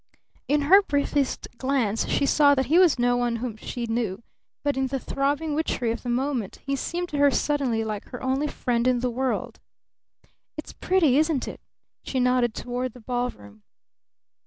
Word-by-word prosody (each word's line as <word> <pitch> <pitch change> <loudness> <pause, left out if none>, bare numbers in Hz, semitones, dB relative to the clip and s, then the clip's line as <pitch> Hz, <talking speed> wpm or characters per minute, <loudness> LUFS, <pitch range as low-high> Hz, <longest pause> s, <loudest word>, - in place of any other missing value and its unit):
In 295 +1 +2
her 375 +8 +7
briefest 285 -5 -1
glance 255 -6 0
she 280 - +1
saw 285 0 +5
that 265 -1 +1
he 320 +7 +4
was 355 -7 +5
no 245 0 +2
one 240 -1 0
whom 230 -1 -4
she 235 +2 -5
knew, 225 -3 -2 0.4
but 285 -1 +1
in 265 0 0
the 270 +1 -2
throbbing 285 +4 -1
witchery 280 -6 -1
of 235 - -4
the 245 - -5
moment 250 -4 -1
he 275 0 0
seemed 345 +6 -3
to 290 - -3
her 285 0 +6
suddenly 270 -5 0
like 215 -2 -4
her 250 - -9
only 265 +3 0
friend 245 -4 -1
in 250 -1 +2
the 250 -1 0
world. 260 +2 -2 1.0
"It's - - -7
pretty, 320 -8 +2
isn't 310 -4 +1
it?" - - -8 0.4
she 260 - -2
nodded 250 -2 +2
toward 245 0 -3
the 250 - -13
ballroom. 225 - -4
255 Hz, 180 wpm, -25 LUFS, 240-285 Hz, 1.0 s, her